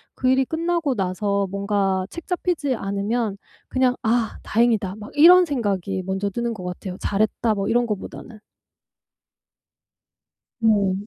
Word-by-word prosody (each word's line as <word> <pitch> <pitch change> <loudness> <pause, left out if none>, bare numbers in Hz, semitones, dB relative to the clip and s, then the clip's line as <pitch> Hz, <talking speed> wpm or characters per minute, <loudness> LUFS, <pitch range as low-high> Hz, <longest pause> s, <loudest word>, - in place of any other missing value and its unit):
그 255 - 0
일이 260 +1 +3
끝나고 330 -2 -1
나서 200 +1 -1
뭔가 200 -1 0
책잡히지 340 -4 -2
않으면 200 +1 -2 0.3
그냥 255 -1 +2
'아 230 0 +1
다행이다.' 220 -4 +1
막 210 -1 -10
이런 355 +4 +8
생각이 200 - -2
먼저 190 +2 -2
드는 235 +2 -2
것 185 - -8
같아요 180 +1 -6
'잘했다.' 215 +2 0
뭐 195 -1 -2
이런 240 +1 +2
거보다는. 215 +1 -6 2.2
네. 205 -4 +3
215 Hz, 265 characters per minute, -22 LUFS, 195-255 Hz, 2.2 s, 이런